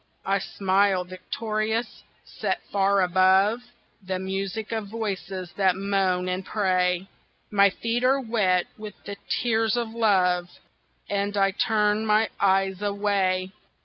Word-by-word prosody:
I 195 +1 +1
smile 195 -1 +1
victorious, 215 +5 -3 0.2
set - - -3
far 200 0 +3
above 190 +5 +4 0.4
The 190 -1 -3
music 195 +3 -4
of 220 -2 -3
voices 195 -4 -5
that 190 -2 +3
moan 190 -2 0
and 185 +1 -2
pray, 185 -2 0 0.4
My 200 -1 +5
feet 230 +5 -2
are 265 +2 +4
wet 210 -8 +1
with 215 -1 -8
the 200 0 -7
tears 225 -1 +1
of 235 -2 -1
love, 185 -6 +2 0.6
And 200 0 -1
I 195 0 +3
turn 210 +1 +1
my 215 +1 +3
eyes 195 0 +2
away. 200 -2 0
200 Hz, 125 wpm, -25 LUFS, 185-215 Hz, 0.6 s, My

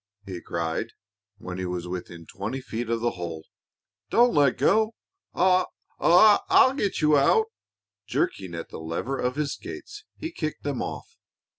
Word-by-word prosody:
he 90 -3 -6
cried, 85 +7 -3 0.4
when 95 -2 -7
he 95 - -2
was 90 -1 -4
within 85 -2 -7
twenty 105 +10 -5
feet 120 -2 -5
of 115 -1 0
the 120 - +1
hole. 85 -3 -6 0.6
"Don't 240 +1 +4
let 145 -3 +3
go. 220 +1 +3 0.4
I 185 0 +4 0.3
I'll 210 +7 +6
get 205 - -1
you 150 0 +5
out!" 445 - +3 0.6
Jerking 95 - -2
at 85 - -6
the - - -8
lever 85 +12 -3
of 125 +1 -1
his 150 -2 -1
skates, 380 +3 -9
he 320 +2 -5
kicked 155 - -4
them 140 -3 -2
off. - - -6
130 Hz, 155 wpm, -26 LUFS, -, 0.6 s, I'll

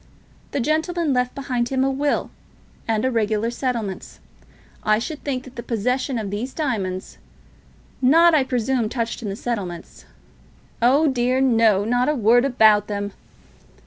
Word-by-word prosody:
The - - -2
gentleman 315 +3 0
left 250 0 0
behind 250 -3 -2
him 265 -1 +1
a 270 - +1
will, 285 +2 -1 0.6
and 220 +1 0
regular 220 0 0
settlements. 235 -7 -4 0.6
I 215 0 +2
should 295 +7 -5
think 260 -3 -3
that 260 -1 -14
the - - -3
possession 250 +4 -1
of 210 -3 -4
these 235 +6 -4
diamonds, 200 - -3 0.8
not, 330 +6 +5
I 300 -3 +4
presume, 250 -2 -1
touched 235 0 -3
on 220 - -5
in - - -2
the 195 - -4
settlements 195 -8 -5 0.4
" - - -31
"Oh 275 +6 +4
dear 255 -1 +1
no; 225 -6 +3
not 245 +4 +1
a 300 - +1
word 240 +1 +4
about 215 -5 +4
them." 205 -1 -3
245 Hz, 155 wpm, -22 LUFS, 215-265 Hz, 0.8 s, not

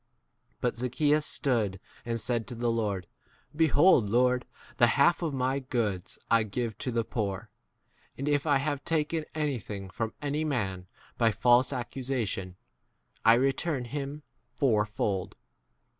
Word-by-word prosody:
But 120 -1 0
Zaccheeus 145 +5 +1
stood 110 -8 0 0.3
and 115 0 -1
said 115 0 -1
to 125 - -6
the 120 0 0
Lord, 105 -5 -1 0.5
Behold, 155 - +5
Lord, 125 +2 +2 0.3
the 120 - +6
half 170 +6 +4
of 165 -3 -1
my 135 0 0
goods 115 -8 -2
I 115 0 +6
give 110 +1 -3
to 125 - -2
the 115 -1 0
poor, 100 -4 -3 0.7
and 140 - -4
if 145 +1 +1
I 145 -2 +4
have 140 0 -2
taken 160 -1 0
any 150 -5 0
thing 100 -2 -7
from 110 +2 -3
any 145 +1 -1
man 95 -11 -2 0.3
by 115 -1 +4
false 120 +4 +4
ac 125 -3 -2
cusation, 115 -9 -3 0.7
I 115 +1 +7
return 135 +2 0
him 145 +3 -5 0.3
fourfold. 105 -6 0
125 Hz, 145 wpm, -29 LUFS, 110-140 Hz, 0.7 s, I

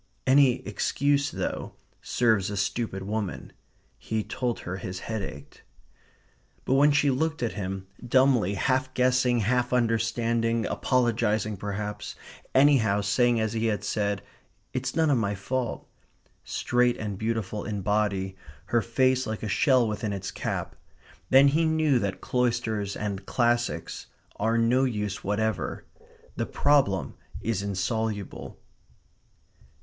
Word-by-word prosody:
Any 130 -1 +4
excuse, 140 0 +1
though, - - -4 0.3
serves 110 -6 +2
a 100 - -4
stupid 100 -1 -2
woman. 105 -1 -4 0.5
He 110 -1 -2
told 120 +1 -3
her 90 +1 -5
his 90 0 -6
head 110 -2 -3
ached. - - -9 1.0
But - - +1
when 145 +2 +5
she 145 -1 +3
looked 160 +1 -1
at 115 - 0
him, 95 -1 -4 0.2
dumbly, 125 -5 +3
half 130 +5 0
guessing, 125 -1 +3
half 125 +4 +1
understanding, 115 -1 +1
apologizing 110 -4 +1
perhaps, 105 +1 -5 0.4
anyhow 130 -8 +4
saying 120 +4 +2
as 110 0 -1
he 115 0 0
had 105 -2 -1
said, 100 -2 -1 0.5
"It's - - -2
none 160 -2 +3
of 130 - +3
my 100 -2 -1
fault," 125 +5 -3 0.6
straight 125 0 +1
and 105 -2 -4
beautiful 110 -1 -2
in 105 -3 -4
body, 100 -2 0 0.4
her 120 - +5
face 130 +3 +1
like 110 0 -4
a - - -2
shell 125 +3 +3
within 105 0 -2
its 95 - -4
cap, - - -4 0.5
then 135 +2 +7
he 155 +4 +2
knew 155 -4 +3
that 100 -3 -3
cloisters 115 -5 -1
and 100 -2 -4
classics 120 -1 0 0.3
are 110 +2 +1
no 120 +3 +3
use 105 -6 -2
whatever. 110 +2 -2 0.5
The - - -1
problem 135 -11 +2 0.3
is 110 -3 -1
insoluble. 105 +1 -3
115 Hz, 130 wpm, -27 LUFS, 105-125 Hz, 1.0 s, then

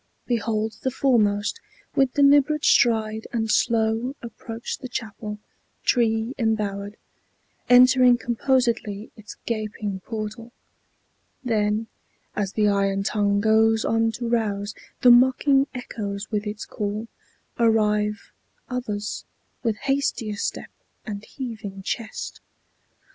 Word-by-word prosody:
Behold 220 -2 -1
the 260 - 0
foremost, 225 - +1 0.4
with 270 -2 +2
deliberate 290 +1 +4
stride 220 -2 +3
And 225 -2 -1
slow, 225 +4 +1
approach 230 0 -6
the 260 - -6
chapel, 215 -3 -5 0.5
tree 225 0 +2
embowered, 205 -2 -1 0.7
Entering 250 0 +7
composedly 235 -4 0
its 215 -1 -11
gaping 215 -3 -3
portal; 220 +3 -6 0.9
Then, 215 -2 +1 0.5
as 200 -2 -2
the 210 -1 +2
iron 195 -1 +1
tongue 200 -1 +1
goes 220 +1 +3
on 225 0 +2
to 240 0 -4
rouse 210 -3 -1 0.3
The 250 - +8
mocking 260 +3 +5
echoes 210 -5 -5
with 210 -1 -1
its 210 0 -5
call, 210 +2 -4 0.5
arrive 210 -2 +2 0.4
Others, 210 -5 -3 0.4
with 225 -4 0
hastier 270 -6 -1
step - - -4 0.3
and 205 -2 -5
heaving 220 -7 -7
chest. 220 +2 -5
220 Hz, 105 wpm, -24 LUFS, 210-240 Hz, 0.9 s, The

